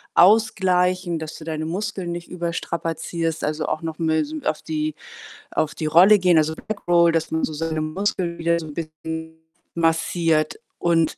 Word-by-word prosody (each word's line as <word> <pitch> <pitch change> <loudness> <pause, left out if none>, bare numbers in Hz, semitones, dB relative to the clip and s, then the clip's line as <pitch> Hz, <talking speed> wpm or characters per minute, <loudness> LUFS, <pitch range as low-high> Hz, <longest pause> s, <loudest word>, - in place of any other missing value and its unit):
ausgleichen, 185 -3 +3
dass 160 0 -7
du - - -10
deine 155 0 -3
Muskeln 190 0 -3
nicht 170 0 -6
überstrapazierst, 165 -1 -3
also, 155 +1 -1
auch 155 - -2
noch 160 0 -5
mal 160 -1 +1
so 155 +1 -6
auf 155 - -1
die 155 -1 -2 0.6
auf 155 - 0
die 155 - -2
Rolle 185 +6 +7
gehen, 180 -3 +4
also, 155 +1 +2
Backroll, 175 -5 +2
dass 165 -1 -1
man 160 - 0
so - - 0
seine 160 0 -2
Muskeln 170 +1 -1
wieder 170 0 +1
so 160 - -7
'n 150 - -8
bisschen 160 0 -6 0.3
massiert. 165 -1 +1 0.2
Und, 165 -2 +2
äh, - - -29
165 Hz, 170 wpm, -23 LUFS, 155-175 Hz, 0.6 s, Rolle